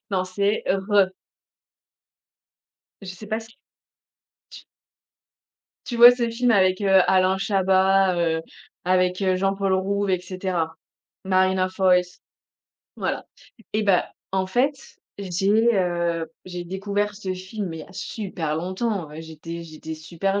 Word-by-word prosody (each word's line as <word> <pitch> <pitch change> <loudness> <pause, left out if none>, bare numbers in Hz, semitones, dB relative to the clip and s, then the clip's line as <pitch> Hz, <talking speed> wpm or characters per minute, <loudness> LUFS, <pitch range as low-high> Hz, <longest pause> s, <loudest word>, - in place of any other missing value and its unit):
Non 185 -1 0
c'est, 200 +3 0
RRRrrrr!!!. 195 0 +2 1.9
Je 195 - -10
sais 210 +3 -11
pas 220 +2 -1
s 225 - -12 1.0
tu - - -12 1.2
Tu 240 - -4
vois 240 +1 +11
ce 240 -1 -1
film 240 +1 +1
avec, 185 -2 +3
heu, 195 -1 +5
Alain 190 0 +3
Chabat, 190 -1 +3
heu, 165 -1 +1 0.4
avec, 185 +1 +2
heu, 185 -1 +2
Jean-Paul 195 0 0
Rouve 200 +1 0
et 185 - +1
cetera, 180 -3 -3 0.5
Marina 185 0 +2
Foïs. 180 -1 +1 0.8
Voilà - - -2 0.5
et 215 - +1
bah, 195 -4 +2 0.2
en 190 -1 0
fait, 255 +9 +1 0.4
j'ai, 200 +5 +2
heu, 170 -3 0
j'ai 180 -1 -6
découvert 200 +3 -2
ce 195 -2 -4
film 190 +2 -5
mais 165 -1 -6
il - - -6
y - - -9
a - - -15
super 180 -6 -4
longtemps, 185 +1 -2
j'étais 165 +1 -8
j'étais 160 0 -8
super 180 +5 -2
190 Hz, 130 wpm, -23 LUFS, 180-200 Hz, 1.9 s, vois